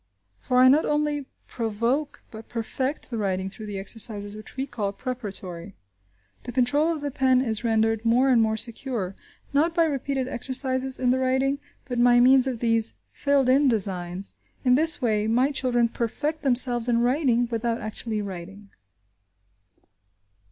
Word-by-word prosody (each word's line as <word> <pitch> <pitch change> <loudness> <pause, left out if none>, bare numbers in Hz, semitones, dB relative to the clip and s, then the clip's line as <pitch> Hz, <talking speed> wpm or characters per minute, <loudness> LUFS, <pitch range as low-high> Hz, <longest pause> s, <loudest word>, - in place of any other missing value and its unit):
For 250 - -1
I 255 +1 +7
not 285 +5 +5
only 295 -2 -1 0.2
provoke, 235 +6 -2
but 220 0 -11
perfect, 260 +5 -3
the 230 - -3
writing 190 -1 -2
through 215 +2 -10
the 205 -1 -5
exercises 205 0 -2
which 215 +4 -12
we 265 - -1
call 210 -7 -3
preparatory. 200 -7 -6 0.7
The 245 - -5
control 275 +6 +2
of 315 -3 -4
the 290 -1 -3
pen 260 -1 +2
is 230 -3 -1
rendered 225 -1 +1
more 245 +4 +3
and 245 -3 +4
more 220 0 +1
secure, 230 -4 -4 0.4
not 320 +4 +2
by 335 - +4
repeated 275 -3 -2
exercises 260 +1 -2
in 250 -1 +2
the 260 - +1
writing, 265 +2 +1 0.3
but 245 -2 0
by 245 0 +5
means 260 +1 +5
of 245 -4 -4
these 230 -1 +1 0.2
filled 280 -2 +1
in 275 +3 +4
designs. 190 -5 -2 0.3
In 250 -2 +4
this 310 +1 +3
way, 215 -2 +1
my 250 +5 +2
children 245 -3 +1
perfect 290 +7 -3
themselves 245 -2 +4
in 235 -1 +2
writing, 245 -2 +2
without 230 0 -1
actually 215 0 -4
writing. 195 +1 -9
245 Hz, 160 wpm, -25 LUFS, 220-265 Hz, 0.7 s, I